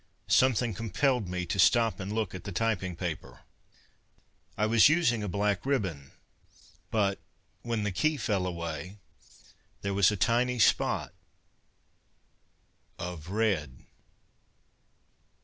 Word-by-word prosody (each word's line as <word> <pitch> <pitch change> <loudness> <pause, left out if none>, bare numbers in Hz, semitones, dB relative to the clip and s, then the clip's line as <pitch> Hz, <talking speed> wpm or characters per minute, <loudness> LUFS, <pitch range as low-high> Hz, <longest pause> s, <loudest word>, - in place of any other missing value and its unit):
Something 125 -3 +3
compelled 115 +2 0
me 90 0 -3
to 95 +3 -3
stop 115 +3 +4
and 100 +1 -5
look 110 -4 -2
at 95 - -7
the 100 - -6
typing 95 -2 -1
paper. 85 -2 -6 1.2
I 105 - +2
was 115 +4 +6
using 150 -9 +2
a 105 - -3
black 100 0 0
ribbon, 95 - -2 0.8
but 100 -3 0 0.4
when 115 -3 -2
the 105 - -1
key 155 - +1
fell 100 -6 -1
away, 85 +2 -5 0.9
there 100 0 -1
was 95 -1 +5
a 105 - -2
tiny 125 +4 +1
spot 90 - +2 1.8
of 90 -2 -7
red.... 95 - -1
100 Hz, 115 wpm, -29 LUFS, 90-115 Hz, 1.8 s, was